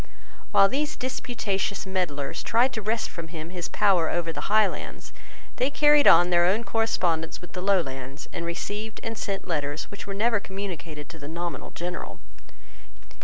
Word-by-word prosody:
While 195 - +7
these 295 +7 -1
disputatious 215 -6 -2
meddlers 175 -8 -2
tried 240 +3 +3
to 220 - -3
wrest 220 +2 0
from 170 -2 -7
him 160 0 -7
his 180 -2 -4
power 190 -6 +3
over 165 -1 -1
the - - -4
Highlands, 215 -1 +1 0.4
they 255 - +2
carried 295 0 +5
on 175 +1 +7
their 175 0 +5
own 195 +6 +3
correspondence 180 -9 0
with 180 - -12
the 180 - -4
Lowlands, 140 -8 -1
and 170 - -3
received 205 +6 -4
and 225 0 -3
sent 195 -3 -3
letters 145 -2 -1
which 200 - -8
were 195 - -4
never 225 +1 +2
communicated 180 -6 -6
to 165 -1 -10
the 145 - -7
nominal 170 -2 -4
General. 180 +2 -5
185 Hz, 165 wpm, -26 LUFS, 165-215 Hz, 0.4 s, While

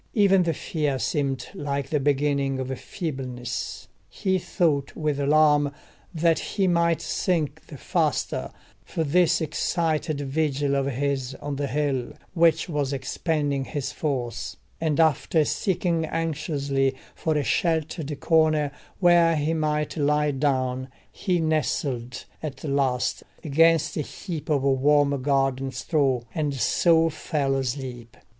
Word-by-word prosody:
Even 195 -3 +5
the 170 -2 +1
fear 150 -4 -1
seemed 135 -1 -1
like 140 -6 -3
the 150 - +2
beginning 140 -1 +1
of 130 0 -3
feebleness: 130 - -5 0.2
he 190 -1 0
thought 155 -6 0
with 150 -3 -1
alarm 145 0 +4 0.4
that 165 -1 +2
he 200 -2 -1
might 170 -2 +2
sink 170 -7 -1
the - - -9
faster 65 - -1 0.3
for 165 - -2
this 170 +4 +3
excited 160 -1 -1
vigil 140 0 0
of 135 0 +1
his 135 -1 -1
on 145 0 -5
the 140 0 -1
hill, 135 -2 -1 0.2
which 165 -2 +3
was 145 -5 -1
expending 145 0 -1
his 140 0 -4
force; 130 -6 -3 0.2
and 160 -1 0
after 160 0 +3
seeking 170 -1 0
anxiously 145 -4 -1 0.2
for 160 -2 -1
a 145 - +1
sheltered 160 -2 -1
corner 155 -3 +3 0.3
where 175 -2 +5
he 155 +2 0
might 150 -1 -1
lie 150 0 +2
down, 130 -2 0 0.2
he 180 -3 -1
nestled 140 -6 -1 0.2
at 145 -4 -6
last 140 -4 0 0.2
against 160 +1 +3
a - - +1
heap 160 +2 -6
of 145 -3 +2
warm 140 +1 +3
garden 135 -1 +1
straw, 135 -5 +1
and 150 -3 -1
so 165 +6 +3
fell 145 -3 -1
asleep. 125 -3 -4
145 Hz, 130 wpm, -25 LUFS, 135-160 Hz, 0.4 s, Even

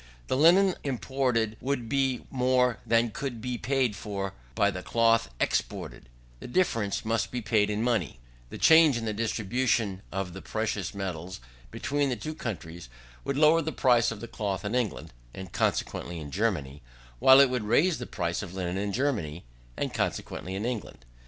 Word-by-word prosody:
The - - +1
linen 180 +7 +5
imported 125 -4 -1
would 130 -3 -2
be 135 0 0
more 125 -2 +2
than 115 0 +3
could 125 0 -4
be 125 +1 -4
paid 130 -2 +1
for 100 -1 -4 0.2
by 100 - +3
the 90 -1 -6
cloth 115 - +2
exported: - - -2 0.3
the - - -8
difference 115 - 0
must 115 0 0
be 125 - -3
paid 105 -1 +2
in 105 +1 -1
money: 110 - 0 0.3
the - - -7
change 160 -5 +6
in 115 - -4
the 110 - -1
distribution 110 -1 0
of 95 -2 -3
the 95 - -8
precious 110 -3 -3
metals 95 -2 -5 0.3
between 145 - -1
the 125 - 0
two 155 +5 -5
countries 85 - -6 0.3
would 140 - -2
lower 155 +2 +5
the 160 0 -3
price 120 -5 +3
of 115 0 -6
cloth 100 -2 -3
in 105 - -2
England, 120 - -2 0.2
(and 95 -2 -8
consequently 85 - -1
in 75 -2 -8
Germany), 80 -9 -1 0.4
while 130 - +8
it 140 -2 +6
would 125 -4 -1
raise 155 - +3
the - - -6
price 85 0 -2
of 95 -3 -8
linen 90 -1 -2
in 100 0 -2
Germany, 100 - -2 0.3
(and - - -2
consequently 95 +2 -3
in 100 +3 -3
England). 110 - -5
115 Hz, 170 wpm, -28 LUFS, 95-130 Hz, 0.4 s, while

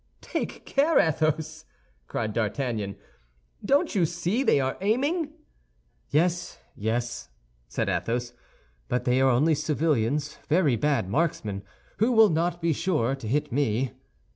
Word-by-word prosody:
"Take - - -4
care, 290 +4 +2
Athos!" 155 0 +1 0.4
cried 110 -2 -2
D'Artagnan; 110 -3 -2 0.7
"don't 285 - +2
you 180 -6 +3
see 175 +8 -1
they 225 - +3
are 130 0 0
aiming?" 285 - +1 0.8
"Yes, 170 +3 0 0.2
yes," 115 - -2 0.4
said - - -2
Athos; 120 +1 -1 0.5
"but 125 0 -1
they 125 +1 +3
are 135 - +5
only 145 +6 +3
civilians—very 150 +1 +1
bad 140 -4 +1
marksmen, 105 - -1 0.4
who 230 +4 +2
will 220 -2 +7 0.3
be 165 -1 +1
sure 150 -8 0
not 135 0 -2
to 115 - -6
hit 145 +4 0
me." 130 -2 0
150 Hz, 125 wpm, -26 LUFS, 120-175 Hz, 0.8 s, will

